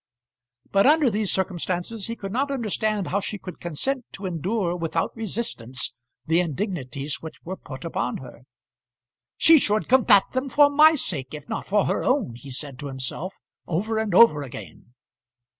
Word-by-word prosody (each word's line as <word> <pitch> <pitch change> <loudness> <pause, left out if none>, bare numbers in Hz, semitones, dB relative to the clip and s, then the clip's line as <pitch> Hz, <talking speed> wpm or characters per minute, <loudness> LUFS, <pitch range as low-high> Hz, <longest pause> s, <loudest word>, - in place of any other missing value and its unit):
But 195 +5 +4
under 300 -4 +5
these 210 -1 0
circumstances 190 +2 -2
he 230 - -4
could 195 -3 -6
not 270 +6 0
understand 215 -6 -1
how 200 - +1
she 205 +1 -4
could 185 -2 -9
consent 250 - -2
to 195 - -6
endure 180 +1 -1
without 165 -1 -2
resistance 180 - -4 0.3
the 165 +2 +3
indignities 150 - -3
which 160 - -9
were 185 +3 -5
put 145 -3 -9
upon 125 -7 -2
her. 125 -1 -12 0.9
"She 325 -1 +7
should 215 -3 +1
combat 235 -6 +6
them 260 +1 -2
for 285 +1 +5
my 310 +2 +7
sake, 150 - -4
if 150 -1 -10
not - - -4
for 205 0 +2
her - - 0
own," 255 - +1
he 120 +4 -11
said 135 0 -6
to 145 - -5
himself 135 +8 -4 0.3
over 215 +7 -1
and 215 -5 -1
over 190 -10 +7
again. 125 -2 -10
190 Hz, 165 wpm, -24 LUFS, 150-225 Hz, 0.9 s, She